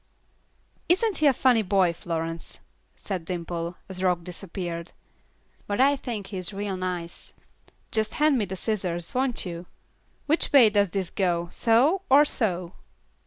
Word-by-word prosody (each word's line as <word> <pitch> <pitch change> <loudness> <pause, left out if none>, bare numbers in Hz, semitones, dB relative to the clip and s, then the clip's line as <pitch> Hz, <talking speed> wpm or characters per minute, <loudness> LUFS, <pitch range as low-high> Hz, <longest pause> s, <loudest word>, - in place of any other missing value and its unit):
"Isn't 390 +4 +2
he 300 - +4
a - - +7
funny 245 -2 +3
boy, 190 -3 +2
Florence?" 165 -1 -5 0.4
said 190 -4 -5
Dimple, 170 0 -4
as 185 -1 -7
Rock 180 -2 +1
disappeared; 175 -1 -6 0.7
"but 205 +2 -2
I 280 +2 +5
think 235 -7 -5
he - - -3
is 185 +1 +1
real 200 -1 -3
nice. 180 -2 -5 0.6
Just 220 -1 0
hand 300 -3 +3
me 210 - +1
the 190 0 -5
scissors, 180 -5 -2
won't 255 -3 0
you? 175 0 -6 0.6
Which 315 +3 +1
way 245 -7 +7
does 205 -1 +3
this 190 -1 -3
go, 175 -3 0
so, 255 +11 +3
or 285 +3 +7
so?" 185 -10 -1
190 Hz, 150 wpm, -26 LUFS, 175-240 Hz, 0.7 s, a